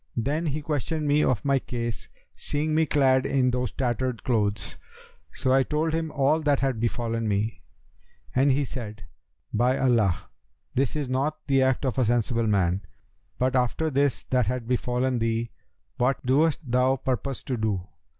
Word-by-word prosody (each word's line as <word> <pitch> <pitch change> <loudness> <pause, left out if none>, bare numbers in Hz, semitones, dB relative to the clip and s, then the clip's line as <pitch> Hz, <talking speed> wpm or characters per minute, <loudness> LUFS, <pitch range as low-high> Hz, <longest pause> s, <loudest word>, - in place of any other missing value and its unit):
Then 150 +8 0
he 150 +1 -2
questioned 150 +1 -2
me 145 +1 +3
of 125 -2 0
my 140 -1 +3
case, 120 -3 -5 0.3
seeing 155 +2 -1
me 160 0 +3
clad 130 -3 +3
in 130 -2 +2
those 125 -2 -1
tattered 125 -1 -2
clothes; 105 -6 0 0.6
so 130 - 0
I 135 - +5
told 155 +4 0
him 160 0 -1
all 145 +3 +2
that 145 -2 +2
had 135 -4 0
befallen 115 0 -1
me, 105 +2 -1 0.7
and 135 +2 +4
he 140 +2 +1
said, 110 -6 -7 0.5
'By 125 +4 +2
Allah, 115 -9 +2 0.5
this 135 +1 0
is 145 -3 -2
not 135 +4 0
the 135 -1 +3
act 130 +1 +2
of 130 0 0
a 125 - +3
sensible 115 0 +1
man! 95 -2 +2 0.6
But 130 +1 +1
after 130 +5 +1
this 140 0 +1
that 125 -4 +2
hath 125 -1 -2
befallen 125 0 0
thee 115 0 -1 0.5
what 125 +2 0
dost 145 +6 +3
thou 125 +1 +2
purpose 130 0 -3
to 130 - -2
do?' 105 -5 -1
130 Hz, 165 wpm, -26 LUFS, 115-140 Hz, 0.7 s, I